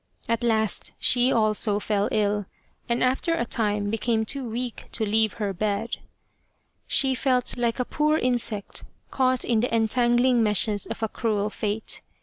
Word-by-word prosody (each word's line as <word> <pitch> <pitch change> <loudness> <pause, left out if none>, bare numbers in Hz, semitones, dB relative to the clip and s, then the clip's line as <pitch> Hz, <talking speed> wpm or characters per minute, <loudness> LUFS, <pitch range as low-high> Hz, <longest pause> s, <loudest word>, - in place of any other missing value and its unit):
At 230 +1 -1
last 220 -3 +1
she 250 +1 +3
also 215 -2 +2
fell 205 -1 -1
ill, 205 -2 0 0.4
and 235 +1 +1
after 265 +6 +1
a 330 - -1
time 210 -3 -1
became 225 0 0
too 265 +1 -1
weak 240 +1 -4
to 220 - 0
leave 220 0 +2
her 205 -3 -3
bed. 210 +4 -2 0.9
She 265 -1 +3
felt 255 -1 +1
like 240 0 -1
a 250 - 0
poor 305 +3 +1
insect 240 -6 -1 0.3
caught 255 -1 +1
in 235 -2 +1
the 245 - -1
entangling 240 +2 +2
meshes 210 -1 +3
of 225 0 -6
a - - +2
cruel 210 -1 -2
Fate. 215 +1 -2
225 Hz, 155 wpm, -25 LUFS, 210-245 Hz, 0.9 s, she